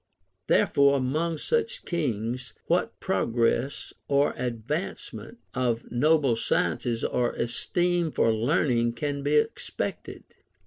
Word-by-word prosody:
Therefore, 140 0 +4
among 155 +6 -1
such 470 - -1
kings, 125 - -2
Avhat - - +2
progress 115 +7 0
or 140 +1 +2
advancement 125 - -4 0.2
of 120 -2 -1
noble 140 0 +3
sciences 115 +1 0
or 125 -1 0
esteem 175 +8 0
for 115 -6 +2
learning 120 0 +1
can 145 +1 -3
be 145 +2 +1
expected 150 - -2
135 Hz, 100 wpm, -27 LUFS, 120-155 Hz, 0.2 s, Therefore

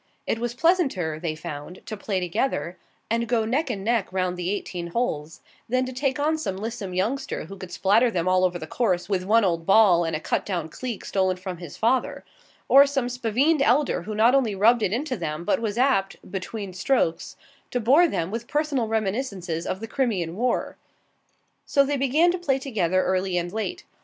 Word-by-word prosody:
It 225 - -1
was 240 0 -3
pleasanter, 260 - +1
they 160 -2 -3
found, 150 +3 -8
to 215 - -5
play 200 -2 -2
together, 175 - -1 0.4
and 230 0 +1
go 230 -2 +1
neck 270 +6 0
and 200 -5 -3
neck 225 -3 0
round 185 -1 -1
the 180 0 -3
eighteen 180 -3 -4
holes, 165 -7 -3 0.3
than 255 +2 +1
to 255 - -6
take 265 +1 -1
on 310 +2 +1
some 195 -11 -3
lissome 210 -3 -5
youngster 220 - -2
who 195 - -9
could 185 -2 -9
spatter 210 +7 +3
them 180 -5 -1
all 185 0 +3
over 180 -1 +1
the 160 - -7
course 185 0 0
with 190 -2 -1
one 220 +2 +4
old 165 -2 -1
ball 195 -4 +6
and 165 -1 -1
a - - -2
cut - - -1
down 175 -5 -3
cleek 240 0 -6
stolen 185 -1 0
from 185 -1 -6
his 170 -3 -9
father; 260 +4 0 0.4
or 280 +1 +7
some 270 -3 -1
spavined 250 +6 +1
elder 275 +3 +2
who 210 +4 -6
not 225 +4 +4
only 245 -7 +2
rubbed 225 +4 +4
it 190 - +1
into 255 +4 -1
them, 165 -4 -4
but 205 - +2
was 220 -1 -2
apt, 245 -7 +2 0.2
between 195 0 -5
strokes, 185 -3 0 0.3
to 250 - -1
bore 275 +10 +5
them 175 - -2
with 230 +2 -4
personal 295 -6 0
reminiscences 200 -6 -2
of 190 - -3
the 225 - -5
Crimean 205 -10 -1
War. 245 +4 -1 0.9
So 280 -1 +4
they 285 +1 -1
began 290 +6 +3
to 360 - -3
play 275 -7 +1
together 190 -9 0
early 185 0 0
and 175 +1 -2
late. 220 +12 -3
215 Hz, 200 wpm, -25 LUFS, 185-255 Hz, 0.9 s, or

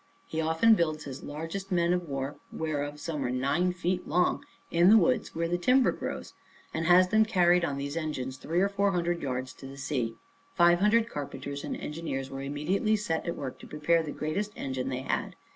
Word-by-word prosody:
He 160 - -3
often 160 +8 +4
builds 160 -6 +1
his 135 -1 -7
largest 165 +7 -6
men 170 -1 +3
of 180 -3 -2
war, 135 +1 -3
whereof 145 -2 -3
some 150 -2 -3
are 125 - -1
nine 140 +8 +1
feet 180 0 -2
long, 180 +3 +1 0.3
in 170 +2 +5
the 220 - +8
woods, 250 -1 +1
where 165 +1 0
the 175 +1 -1
timber 255 +8 +4
grows, - - -6 0.4
and 160 0 -1
has 180 +1 +6
them 220 +2 +5
carried 180 -4 +3
on 145 -5 -1
these 140 +2 -4
engines 130 -5 -3
three 170 +6 -1
or 195 - +4
four 200 0 +1
hundred 175 -1 0
yards 130 -1 -3
to 135 - -11
the 135 +1 -10
sea. 125 -5 -2 0.4
Five 175 0 +5
hundred 220 +3 +4
carpenters 140 -3 -6
and - - -4
engineers 150 -4 -4
were 135 0 -5
immediately 150 +10 0
set 180 -6 -2
at 170 - -1
work 130 -2 -6
to - - -11
prepare 160 +3 +2
the 155 - -6
greatest 200 +9 -2
engine 130 -1 -3
they 130 -1 -3
had. - - -2
165 Hz, 205 wpm, -29 LUFS, 140-180 Hz, 0.4 s, the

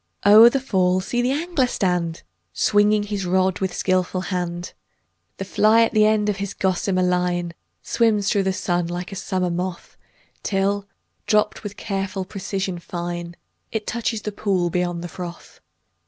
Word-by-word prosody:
o'er 215 +3 +9
the 275 - 0
fall 185 -8 +1
see 240 +6 -1
the 245 - +1
angler 295 -1 0
stand, 180 -6 -1 0.3
Swinging 210 0 +3
his 205 -1 -3
rod 185 0 +1
with 190 -1 -1
skilful 185 0 0
hand; 175 -2 -4 0.6
The - - -4
fly 220 +2 +4
at 230 - +1
the 215 0 +4
end 215 -1 +2
of 205 -2 0
his 200 -1 -4
gossamer 185 0 0
line 180 -1 0 0.3
Swims 215 -4 +1
through 200 - +2
the 190 0 +1
sun 175 -2 -1
like 175 +2 -5
a - - -6
summer 185 -1 -1
moth, 180 0 -5 0.4
Till, 200 0 0 0.4
dropt 210 -1 +2
with 205 -2 -6
a - - -34
careful 195 -2 -3
precision 190 -2 -4
fine, 175 0 -5 0.4
It 220 -2 -3
touches 225 -2 -2
the 210 - -3
pool 190 -4 0
beyond 175 -1 -1
the - - -4
froth. 175 0 -9
190 Hz, 165 wpm, -22 LUFS, 180-210 Hz, 0.6 s, o'er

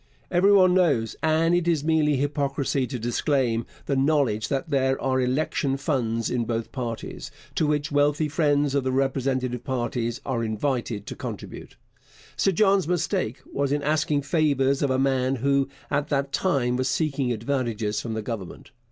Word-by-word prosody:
Every 185 +3 +4
one 185 -3 +6
knows, 145 -12 +2
and 160 +1 +2
it 175 -1 +1
is 160 -4 +2
mere 155 -2 +2
hypocrisy 140 -1 -1
to 130 - -4
disclaim 120 0 0 0.2
the 140 - 0
knowledge, 135 -6 +2
that 140 +3 -2
there 135 -1 +1
are 130 -1 +1
election 135 +1 0
funds 115 -6 -1
in 120 -2 0
both 115 0 -3
parties, 120 -4 -5 0.2
to 155 - +1
which 150 0 0
wealthy 145 +2 +2
friends 145 -2 +1
of 140 -2 +1
the 130 - 0
respective 130 -2 -1
parties 120 -1 -2
are 120 -4 -1
invited 115 -1 -2
to - - -6
contribute. - - -8 0.6
Sir 195 - +2
John's 195 -2 +3
mistake 175 - -1
was 140 -1 0
in 145 0 0
asking 150 -1 +1
favours 140 -3 +1
of 140 - +1
a 130 - +1
man 130 -1 +1
who 140 +2 +1 0.2
at 145 0 0
that 140 -2 -1
time 135 -9 +1
was 130 0 0
seeking 140 -5 0
advantages 115 -3 -1
from 115 -2 -4
the 110 - -3
Government. 110 +1 -7
135 Hz, 165 wpm, -25 LUFS, 125-150 Hz, 0.6 s, one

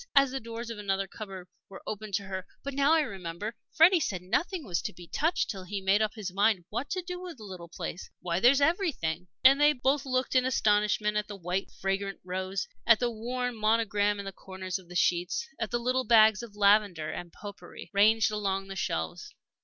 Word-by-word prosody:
as 275 -2 +6
the 270 - -2
doors 230 0 -6
of 220 - -7
another 195 -1 -1
cupboard 190 -3 -8 0.2
were 195 - -11
opened 215 -1 -4
to 200 - -1
her. 190 -1 -6 0.2
"But 280 - -4
now 280 +3 +3
I 325 - +5
remember, 195 - -5 0.2
Freddie 340 +3 +6
said 185 - -2
nothing 335 - -1
was 175 -5 -1
to - - -5
be 175 0 -12
touched 325 - 0
till 195 -3 -7
he 195 +2 -4
made 195 +2 +3
up 215 +1 0
his 200 -5 -5
mind 200 -2 +2
what 240 +6 -3
to 370 0 -2
do 360 0 -6
with 355 -5 -8
the 220 - -12
little 185 -4 -9
place. 170 +1 -6
Why, 170 0 -1
there's 260 +6 +5
everything!" 280 - 0 0.2
And 270 +2 +7
they 295 +1 +6
both 270 +1 +1
looked 255 -1 -1
in 255 -1 +4
astonishment 210 -3 +2
at 210 - -1
the 205 - -7
white, 180 +1 -3
fragrant 195 +1 -2
rows, 185 +1 -3 0.2
at 230 -2 +7
the 245 -1 0
worn 245 +2 -3
monogram 215 -2 +2
in 200 - -6
the 195 - -4
corners 190 0 -6
of 180 -2 -18
the 180 - -10
sheets, 180 - +1
at 225 -2 -2
the 240 - 0
little 255 +2 0
bags 220 -3 +6
of 230 -3 -10
lavender 200 -6 +3
and 175 -1 -7
pot 205 +2 -9
pourri - - -11
ranged 215 +2 +4
along 195 -2 -2
the 195 - -6
shelves. 80 - -3
210 Hz, 215 wpm, -29 LUFS, 190-250 Hz, 0.2 s, And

